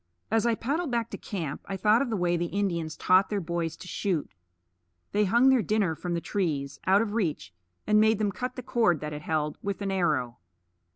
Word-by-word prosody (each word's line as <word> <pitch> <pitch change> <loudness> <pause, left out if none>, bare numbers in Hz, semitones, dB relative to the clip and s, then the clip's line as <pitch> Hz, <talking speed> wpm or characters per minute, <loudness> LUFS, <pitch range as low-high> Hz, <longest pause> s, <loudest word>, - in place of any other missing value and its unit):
As 225 +1 +2
I 230 - +2
paddled 290 +8 -2
back 235 -2 -1
to - - -5
camp, 165 -9 -5
I 195 - -3
thought 210 +4 +4
of 275 - -1
the 220 - -1
way 175 -1 +1
the 170 0 -1
Indians 170 -5 -2
taught 185 +2 +4
their 205 - 0
boys 170 -2 -3
to 185 - -11
shoot. 180 -5 -2 0.8
They 210 +1 +2
hung 235 +7 +5
their 260 -3 +5
dinner 210 -6 +1
from 175 +2 -3
the - - 0
trees, 150 -10 -2
out 195 +3 +5
of 210 -2 -4
reach, 160 - -2 0.3
and 210 0 +4
made 220 0 +4
them 210 -1 0
cut 250 +6 -4
the 255 - -6
cord 230 - +2
that 150 0 -4
held 150 -1 -1
it, - - -39
with 200 0 -3
an 195 - -1
arrow. 150 - 0
195 Hz, 220 wpm, -27 LUFS, 165-220 Hz, 0.8 s, hung